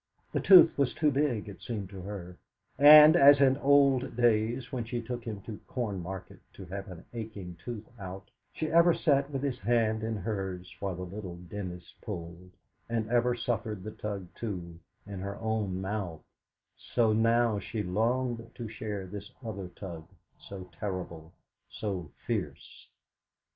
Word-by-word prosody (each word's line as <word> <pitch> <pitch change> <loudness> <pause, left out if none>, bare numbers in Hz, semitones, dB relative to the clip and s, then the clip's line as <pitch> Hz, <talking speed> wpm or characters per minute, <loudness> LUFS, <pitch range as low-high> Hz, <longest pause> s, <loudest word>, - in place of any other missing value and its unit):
The - - 0
tooth 180 -4 +8
was 135 -3 +1
too 150 -2 +2
big, 135 -7 0
it 100 - -10
seemed 105 -5 -5
to 95 -2 -8
her; 90 -2 -7 0.4
and, 150 +2 +10
as 140 -3 +8
in 135 -1 +5
old 140 -3 +3
days, 120 +1 +1
when 125 -4 -2
she 120 +2 -3
took 120 +1 -5
him 105 -4 -5
to 105 +1 -8
Cornmarket 95 -6 -5
to 95 - -10
have 95 +2 -6
an 90 -3 -10
aching 105 -6 -7
tooth 115 -3 -6
out, 95 0 -8 0.2
she 155 -1 -3
ever 170 0 +6
sat 140 -2 +2
with 135 -1 -4
his 135 -3 -2
hand 110 0 +1
in 110 0 -2
hers 95 -3 -4
while 100 -2 -3
the 90 - -6
little 90 -1 -7
dentist 90 0 -8
pulled, 85 -2 -7 0.4
and 115 -1 -2
ever 120 0 +3
suffered 110 -4 -3
the 110 - -6
tug, 100 -3 -5
too, 90 -7 -6 0.3
in 100 -2 -7
her 100 +1 -5
own 110 -4 -2
mouth, 95 -5 -4 0.5
so 115 -3 +1
now 115 -1 +3
she 105 +2 -4
longed 115 +5 -1
to 120 - -6
share 105 -3 -5
this 100 +2 -8 0.2
other 100 -4 -5
tug, 85 -3 -9 0.3
so 95 -2 -9
terrible, 90 -5 -5 0.4
so 95 -7 -4 0.2
fierce. - - -4
105 Hz, 160 wpm, -30 LUFS, 95-120 Hz, 0.5 s, and